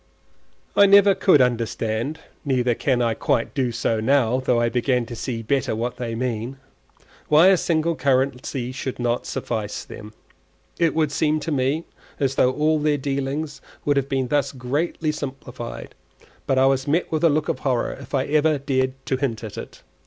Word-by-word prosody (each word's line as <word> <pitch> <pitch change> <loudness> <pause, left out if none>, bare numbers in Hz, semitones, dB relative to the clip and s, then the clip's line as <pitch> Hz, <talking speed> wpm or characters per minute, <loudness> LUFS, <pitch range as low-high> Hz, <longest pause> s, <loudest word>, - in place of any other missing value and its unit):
I 200 - +7
never 200 0 +7
could 185 -6 +4
understand 120 +3 -1 0.2
(neither 125 -3 +1
can 125 +1 0
I 115 -1 +1
quite 115 +1 -1
do 130 -4 0
so 115 -1 -1
now, 125 +1 +2
though 125 -2 +1
I 120 - +2
begin 125 0 0
to 120 - -8
see 115 -1 -4
better 130 0 0
what 120 +2 -3
they 115 -2 -4
mean) 120 +1 -3 0.7
why 155 +5 +6
a 195 - +6
single 165 -1 0
currency 130 -2 0
should 130 0 -5
not 120 0 -1
suffice 110 -3 -4
them; 105 0 -10 0.7
it 165 -2 +2
would 155 -2 +1
seem 155 +1 +1
to 160 - -3
me 140 +4 0 0.3
as 135 -2 +1
though 130 -1 +3
all 155 +3 +1
their 150 0 +1
dealings 140 +2 -3 0.2
would 145 - +2
have 140 0 0
been 130 -2 -1
thus 145 -2 +1
greatly 145 +5 -1
simplified; 130 -5 -7 0.5
but 135 -2 +2
I 130 - +5
was 135 +1 +1
met 160 +5 0
with 160 +1 -1
a 165 - +6
look 155 +1 0
of - - -1
horror 125 -4 0
if - - -7
ever 150 +3 +2
I - - -2
dared 130 -1 0
to 130 - 0
hint 125 -5 -2
at 110 - -7
it. - - -9
135 Hz, 180 wpm, -23 LUFS, 125-150 Hz, 0.7 s, I